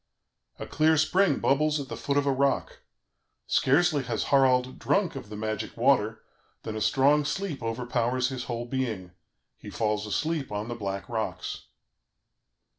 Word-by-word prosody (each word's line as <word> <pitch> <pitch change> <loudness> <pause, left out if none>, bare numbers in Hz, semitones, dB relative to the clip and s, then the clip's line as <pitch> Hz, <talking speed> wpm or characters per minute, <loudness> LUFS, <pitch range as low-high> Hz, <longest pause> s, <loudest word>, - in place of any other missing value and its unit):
"A - - -6
clear 160 +1 +3
spring 160 +1 +3
bubbles 150 +2 +2
at 140 - -5
the - - -6
foot 140 0 -1
of 145 - +2
a 140 - +2
rock; 135 +1 0 0.7
scarcely 145 +2 +3
has 120 - -2
Harald 130 -1 +3
drunk 195 -6 +1
of 130 -6 -8
the 105 - -7
magic 110 0 -4
water - - +2 0.4
than 110 - -5
a 110 - -4
strong 140 +6 +3
sleep 150 +1 -3
overpowers 120 +2 -1
his 130 -2 -5
whole 120 -1 -4
being; 115 -8 -3 0.5
he - - -9
falls 105 -1 -1
asleep 155 +4 -2
on 105 +2 -4
the - - -2
black 100 -3 -4
rocks. 110 -2 -4
130 Hz, 155 wpm, -27 LUFS, 115-145 Hz, 0.7 s, clear